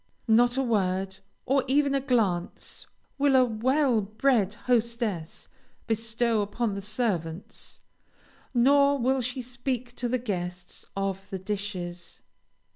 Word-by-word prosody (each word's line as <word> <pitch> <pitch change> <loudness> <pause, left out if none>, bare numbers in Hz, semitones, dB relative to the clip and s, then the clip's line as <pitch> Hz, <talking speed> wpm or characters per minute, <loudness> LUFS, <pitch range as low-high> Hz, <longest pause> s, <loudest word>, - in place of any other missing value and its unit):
Not 240 +3 +4
a 270 - +2
word, 190 -4 0 0.3
or 270 0 +2
even 280 +1 +3
a 275 - +1
glance, 215 -10 -1 0.3
will 280 -1 +4
a 255 -1 +6
well 250 +2 +2
bred 215 0 +1
hostess 230 -8 -1 0.4
bestow 225 0 0
upon 210 +2 -1
the 200 - -4
servants, 195 -6 -3 0.7
nor 280 +3 +5
will 260 +1 +1
she 250 +1 -3
speak 245 0 -4
to 245 - -2
the 255 - +2
guests 180 -6 -5
of 195 0 -2
the 190 - -3
dishes. 185 -3 -5
230 Hz, 120 wpm, -27 LUFS, 195-255 Hz, 0.7 s, a